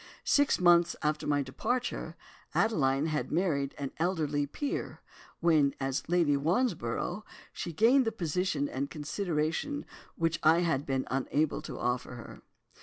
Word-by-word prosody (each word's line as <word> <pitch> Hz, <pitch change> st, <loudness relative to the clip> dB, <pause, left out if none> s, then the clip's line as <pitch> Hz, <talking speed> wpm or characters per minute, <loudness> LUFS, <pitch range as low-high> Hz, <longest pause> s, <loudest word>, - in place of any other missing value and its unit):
Six 285 Hz, -1 st, +3 dB
months 175 Hz, -1 st, +5 dB
after 150 Hz, 0 st, 0 dB
my 145 Hz, -1 st, +2 dB
departure, 230 Hz, -, -3 dB, 0.4 s
Adeline 140 Hz, -10 st, +2 dB
had 155 Hz, -2 st, -2 dB
married 150 Hz, -5 st, 0 dB
an 140 Hz, -2 st, -4 dB
elderly 155 Hz, -5 st, 0 dB
peer, 285 Hz, -, -4 dB, 0.4 s
when, 155 Hz, -5 st, +3 dB
as 135 Hz, +3 st, -2 dB
Lady 170 Hz, -5 st, +3 dB
Wandsborough, 175 Hz, -, -1 dB, 0.3 s
she 170 Hz, -, -4 dB
gained 240 Hz, -, +4 dB
the 225 Hz, -, 0 dB
position 175 Hz, -6 st, -1 dB
and 140 Hz, +1 st, -3 dB
consideration 160 Hz, -, -2 dB, 0.3 s
which 165 Hz, 0 st, 0 dB
I 160 Hz, +2 st, +5 dB
had 160 Hz, -5 st, 0 dB
been 135 Hz, -1 st, 0 dB
unable 140 Hz, +3 st, 0 dB
to -, -, -7 dB
offer 125 Hz, +1 st, -2 dB
her. 120 Hz, -, -10 dB
155 Hz, 135 wpm, -30 LUFS, 140-180 Hz, 0.4 s, months